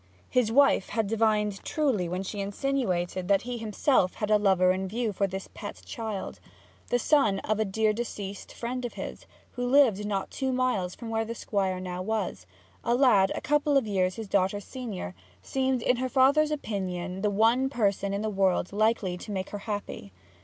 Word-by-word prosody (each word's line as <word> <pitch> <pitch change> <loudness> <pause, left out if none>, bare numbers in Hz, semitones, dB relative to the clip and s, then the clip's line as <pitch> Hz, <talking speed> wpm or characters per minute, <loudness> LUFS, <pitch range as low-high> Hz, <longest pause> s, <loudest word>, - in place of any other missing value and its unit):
His 245 -3 +2
wife 275 -6 +4
had 225 -2 0
divined 210 -2 +1
truly 255 - 0
when 180 +2 -2
she 200 +2 -5
insinuated 195 -5 -1
that 200 0 +3
he 245 0 -4
himself 215 -2 +1
had 210 0 -2
a 210 - +5
lover 190 -3 +4
in 190 +1 -2
view 225 +2 -2
for 200 +1 +1
this 190 +1 -6
pet 205 -1 -8
child. 220 -4 -5 0.5
The 245 - +3
son 245 -6 +3
of 215 0 -1
a 220 - +2
dear 215 +2 +1
deceased 205 -3 -5
friend 250 +2 -4
of 240 - -4
his, - - -7 0.2
who 245 - -4
lived 245 -5 +4
not 195 -2 -2
two 265 -1 -1
miles 250 -8 0
from 230 -2 -7
where 225 0 +1
the 230 +1 -5
Squire 190 -4 -1
now 180 -1 -4
was, 195 - -3 0.4
a 235 - +2
lad 220 -8 +5
a - - -4
couple 295 0 +2
of 265 - +2
years 185 -3 0
his 220 -2 -6
daughter's 195 +1 0
senior, 215 - -6 0.3
seemed 260 -2 0
in 250 - +3
her 255 +1 -1
father's 280 +4 +4
opinion 190 -9 -3
the 210 - +2
one 225 +6 +3
person 200 -6 0
in 200 +1 -2
the - - 0
world 195 -2 +1
likely 210 -4 +1
to 210 - -8
make 190 -1 -3
her 205 - -4
happy. 205 - -5
210 Hz, 190 wpm, -28 LUFS, 190-245 Hz, 0.5 s, a